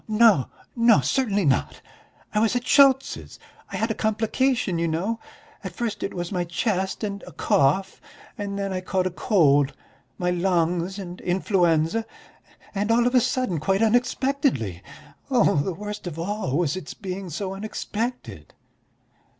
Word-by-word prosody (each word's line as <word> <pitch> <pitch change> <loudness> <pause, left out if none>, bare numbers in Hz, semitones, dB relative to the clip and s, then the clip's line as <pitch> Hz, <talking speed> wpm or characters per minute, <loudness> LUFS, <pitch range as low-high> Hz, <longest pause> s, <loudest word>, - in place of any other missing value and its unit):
"Oh, 215 - -1
no, 220 - +5 0.3
no! 230 - +5
Certainly 205 - +1
not! 135 -3 +1 0.5
I 210 - +2
was 225 +2 +2
at 245 0 -1
Schultz's; 270 -1 +3 0.3
I - - -5
had 225 +1 0
a - - +1
complication, 220 -2 0
you 170 - +1
know, 190 +9 -1 0.4
at 190 -3 -6
first 235 -1 -3
it - - -4
was 175 -1 -4
my 180 -3 0
chest 190 +3 -2
and 200 -1 -3
a - - -9
cough, 170 +8 +1 0.3
and 200 -3 -4
then 195 -1 -2
I 185 - -2
caught 185 0 -1
a 185 - -1
cold: 145 - +3 0.4
my 180 -1 0
lungs 175 0 0
and 180 -2 -7
influenza... 180 +2 +1 0.7
and 205 +1 -1
all 235 +1 +4
of 245 - +1
a 250 - +5
sudden, 240 - 0
quite 195 +7 +1
unexpectedly... 245 - +1 0.5
the 195 - +2
worst 210 -1 -6
of 165 -3 -6
all 170 -5 -2
was 170 -3 +1
its 185 -5 -7
being 190 -1 -6
so 190 +4 -4
unexpected." 210 - -5
195 Hz, 155 wpm, -24 LUFS, 175-225 Hz, 0.7 s, no